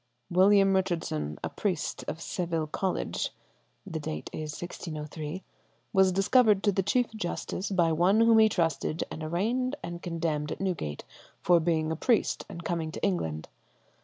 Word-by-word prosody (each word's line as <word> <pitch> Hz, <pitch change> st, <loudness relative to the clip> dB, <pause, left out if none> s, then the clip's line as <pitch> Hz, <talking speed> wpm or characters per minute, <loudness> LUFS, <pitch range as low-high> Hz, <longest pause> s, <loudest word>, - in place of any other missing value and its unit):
"William 195 Hz, +2 st, +5 dB
Richardson, 165 Hz, -, -1 dB
a -, -, -1 dB
priest 185 Hz, -7 st, -2 dB
of 160 Hz, -, -4 dB
Seville 170 Hz, -3 st, -2 dB
College 185 Hz, +4 st, -2 dB, 0.6 s
(the 165 Hz, -5 st, -4 dB
date 75 Hz, -, -5 dB
is 155 Hz, -1 st, -5 dB
1603), 155 Hz, 0 st, -6 dB, 0.5 s
was 190 Hz, -1 st, +5 dB
discovered 205 Hz, +2 st, +4 dB
to 205 Hz, -, +4 dB
the 195 Hz, -, +1 dB
Chief 245 Hz, +5 st, +1 dB
Justice 195 Hz, -1 st, -3 dB
by 175 Hz, -4 st, +2 dB
one 180 Hz, +7 st, +4 dB
whom 230 Hz, -1 st, +6 dB
he 220 Hz, 0 st, +6 dB
trusted, 165 Hz, -4 st, 0 dB
and 155 Hz, -, -6 dB
arraigned 225 Hz, -, 0 dB
and 170 Hz, 0 st, -6 dB
condemned 165 Hz, -4 st, -2 dB
at -, -, -4 dB
Newgate 170 Hz, -, -3 dB, 0.4 s
for 175 Hz, -1 st, +5 dB
being 160 Hz, -1 st, +1 dB
a -, -, 0 dB
priest 230 Hz, -, +1 dB
and 170 Hz, -, -8 dB
coming 165 Hz, -2 st, -2 dB
to -, -, -8 dB
England. 80 Hz, -, -1 dB
175 Hz, 155 wpm, -29 LUFS, 155-195 Hz, 0.6 s, whom